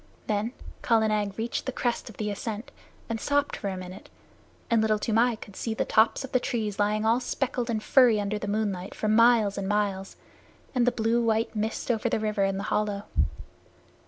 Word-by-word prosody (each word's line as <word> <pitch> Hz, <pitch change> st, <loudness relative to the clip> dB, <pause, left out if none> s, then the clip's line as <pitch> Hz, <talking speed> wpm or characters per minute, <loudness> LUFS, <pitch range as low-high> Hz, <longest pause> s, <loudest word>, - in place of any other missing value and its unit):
Then 215 Hz, +3 st, -1 dB, 0.3 s
Kala 225 Hz, -2 st, +3 dB
Nag 205 Hz, -2 st, -1 dB
reached 230 Hz, +4 st, -3 dB
the -, -, 0 dB
crest 240 Hz, -2 st, -2 dB
of 220 Hz, -, -13 dB
the 210 Hz, -1 st, -2 dB
ascent 215 Hz, +2 st, -5 dB, 0.4 s
and 225 Hz, -1 st, -3 dB
stopped 285 Hz, 0 st, +1 dB
for 200 Hz, -, -4 dB
a 190 Hz, -, -4 dB
minute, 185 Hz, 0 st, -9 dB, 0.6 s
and 230 Hz, -1 st, +3 dB
Little 215 Hz, -1 st, +2 dB
Toomai 230 Hz, +3 st, +2 dB
could 205 Hz, -2 st, -12 dB
see 225 Hz, +2 st, -3 dB
the -, -, 0 dB
tops 220 Hz, +5 st, +3 dB
of 265 Hz, -, -8 dB
the 255 Hz, -, +3 dB
trees 215 Hz, -4 st, -2 dB
lying 210 Hz, +1 st, +1 dB
all 230 Hz, +2 st, +4 dB
speckled 250 Hz, -1 st, -2 dB
and 220 Hz, -2 st, -1 dB
furry 245 Hz, -5 st, +5 dB
under 205 Hz, +1 st, -2 dB
the 205 Hz, -, -5 dB
moonlight 200 Hz, -3 st, -2 dB
for 215 Hz, -, -2 dB
miles 215 Hz, -2 st, +4 dB
and 195 Hz, -, -3 dB
miles, 200 Hz, -2 st, -1 dB, 0.6 s
and 250 Hz, -2 st, +2 dB
the -, -, +5 dB
blue 230 Hz, +1 st, +1 dB
white 225 Hz, 0 st, 0 dB
mist 220 Hz, +3 st, -1 dB
over 235 Hz, +1 st, 0 dB
the -, -, 0 dB
river 210 Hz, -2 st, 0 dB
in 195 Hz, 0 st, 0 dB
the 195 Hz, -, -3 dB
hollow. 205 Hz, -1 st, 0 dB
220 Hz, 200 wpm, -27 LUFS, 205-235 Hz, 0.6 s, furry